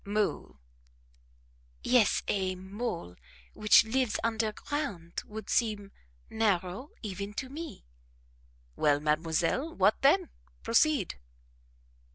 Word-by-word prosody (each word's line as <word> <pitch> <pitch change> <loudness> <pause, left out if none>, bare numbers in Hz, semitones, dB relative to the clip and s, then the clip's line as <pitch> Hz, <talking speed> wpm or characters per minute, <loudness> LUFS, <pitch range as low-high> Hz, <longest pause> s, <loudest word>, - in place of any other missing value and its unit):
"Mole." 200 - -1 1.3
"Yes 245 -4 +3
a 190 -2 0
mole, 190 - -5 0.4
which 215 0 +6
lives 245 0 0
underground 220 - -2
would 215 -1 -8
seem 210 -4 0 0.4
narrow 205 - 0
even 200 0 -5
to 260 +2 -4
me." 310 - -8 0.9
"Well, 145 -1 +3
mademoiselle 165 - 0
what 210 - +3
then? 335 +6 +4 0.3
Proceed." 230 - +2
210 Hz, 90 wpm, -30 LUFS, 185-250 Hz, 1.3 s, which